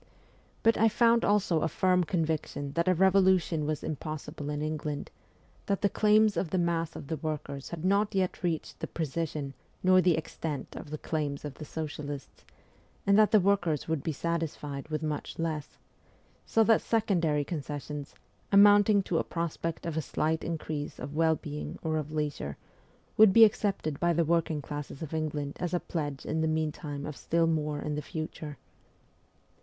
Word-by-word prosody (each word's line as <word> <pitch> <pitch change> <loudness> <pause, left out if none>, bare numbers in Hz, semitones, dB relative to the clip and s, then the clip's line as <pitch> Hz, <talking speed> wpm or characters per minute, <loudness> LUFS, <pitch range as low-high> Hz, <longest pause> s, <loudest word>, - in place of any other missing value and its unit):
But 225 - +4
I 225 +1 +5
found 230 +1 +4
also 190 -6 +2
a 165 - +2
firm 180 +2 +2
conviction 155 -4 -2
that 170 +2 0
a 185 - +4
revolution 185 -4 +3
was 155 -1 -2
impossible 155 -1 -5
in 145 0 -2
England; 150 -1 -3 0.6
that 200 +2 0
the 200 - +4
claims 215 0 +4
of 180 - -1
the 185 - 0
mass 170 -2 0
of - - -7
the 160 +3 -3
workers 150 -2 -4
had 170 0 -5
not 200 +2 +2
yet 185 -1 0
reached 170 -4 -2
the - - -3
precision 155 -3 -3 0.3
nor 185 0 +6
the 175 -3 +3
extent 155 -2 -5
of - - -8
the 155 - -4
claims 150 -2 -3
of 145 - -5
the 155 - -9
socialists, 145 -2 -6 0.6
and 200 - +5
that 215 - +6
the 215 -1 +6
workers 175 -6 +1
would 160 -3 0
be 160 - -2
satisfied 150 -3 -3
with 155 0 -2
much 150 -1 -3
less; 160 -3 -3 0.7
so 225 - +4
that 225 0 +4
secondary 170 -10 +1
concessions, 145 -1 -5 0.4
amounting 205 0 +6
to 170 -3 0
a - - 0
prospect 165 -1 -3
of 165 -2 -3
a 160 - +1
slight 160 +2 -1
increase 155 -3 -4
of 135 +3 -6
well 160 0 +3
being 150 -2 -6
or 160 -1 0
of 155 -1 -4
leisure, 145 - -3 0.6
would 215 -2 +8
be 225 +3 +9
accepted 195 -8 -1
by 175 0 +2
the 170 0 +2
working 160 -2 +1
classes 145 0 -6
of 160 - -7
England 150 -2 -2
as 180 0 -1
a - - +1
pledge 145 -6 -4
in 160 - -1
the 160 - +2
meantime 155 -2 -2
of 150 - -5
still 165 +3 +1
more 150 -2 0
in 150 - -3
the 150 - -2
future. 155 -2 -6
160 Hz, 175 wpm, -29 LUFS, 150-180 Hz, 0.7 s, be